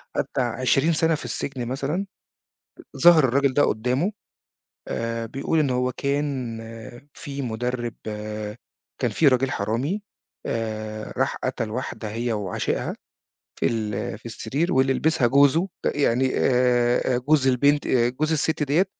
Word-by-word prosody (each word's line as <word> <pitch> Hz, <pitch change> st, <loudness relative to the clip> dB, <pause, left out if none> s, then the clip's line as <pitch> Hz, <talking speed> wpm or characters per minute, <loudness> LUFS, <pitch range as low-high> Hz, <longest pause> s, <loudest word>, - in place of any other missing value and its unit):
عدَّى -, -, 0 dB
20 130 Hz, +6 st, +2 dB
سنة 160 Hz, 0 st, +2 dB
في -, -, -7 dB
السجن 130 Hz, -4 st, -4 dB
مثلًا، 140 Hz, +9 st, -2 dB, 0.9 s
ظهر 170 Hz, -2 st, +7 dB
الراجل 135 Hz, +1 st, +2 dB
ده 145 Hz, -, +4 dB
قدامه 125 Hz, -, +1 dB, 0.8 s
آآ 115 Hz, 0 st, -2 dB
بيقول 135 Hz, +7 st, -1 dB
إن 145 Hz, -3 st, +2 dB
هو 125 Hz, 0 st, +1 dB
كان 140 Hz, -4 st, -2 dB, 0.6 s
فيه 140 Hz, -3 st, -6 dB
مدرب 120 Hz, 0 st, -3 dB, 1.1 s
كان 125 Hz, -3 st, +1 dB
فيه 150 Hz, +8 st, +3 dB
راجل 130 Hz, 0 st, +3 dB
حرامي 125 Hz, -, -1 dB, 0.4 s
آآ 110 Hz, -1 st, -4 dB
راح -, -, +1 dB
قتل 110 Hz, -, -2 dB
واحدة 115 Hz, -2 st, -4 dB
هي 115 Hz, +2 st, -1 dB
وعشيقها 100 Hz, -4 st, -2 dB, 0.6 s
في -, -, +1 dB
ال 105 Hz, -3 st, -2 dB
في 110 Hz, -, -25 dB
السرير 140 Hz, +9 st, -2 dB
واللي 130 Hz, 0 st, +3 dB
لبسها 155 Hz, -3 st, +2 dB
جوزه 140 Hz, +7 st, +4 dB, 0.2 s
يعني 130 Hz, -2 st, +2 dB
آآ 125 Hz, 0 st, +2 dB
جوز 140 Hz, +2 st, +2 dB
البنت 140 Hz, +3 st, +3 dB
آآ 120 Hz, -2 st, +3 dB
جوز 155 Hz, +5 st, -1 dB
الست 160 Hz, 0 st, +1 dB
ديّة 150 Hz, +7 st, +3 dB
130 Hz, 135 wpm, -24 LUFS, 120-145 Hz, 1.1 s, ظهر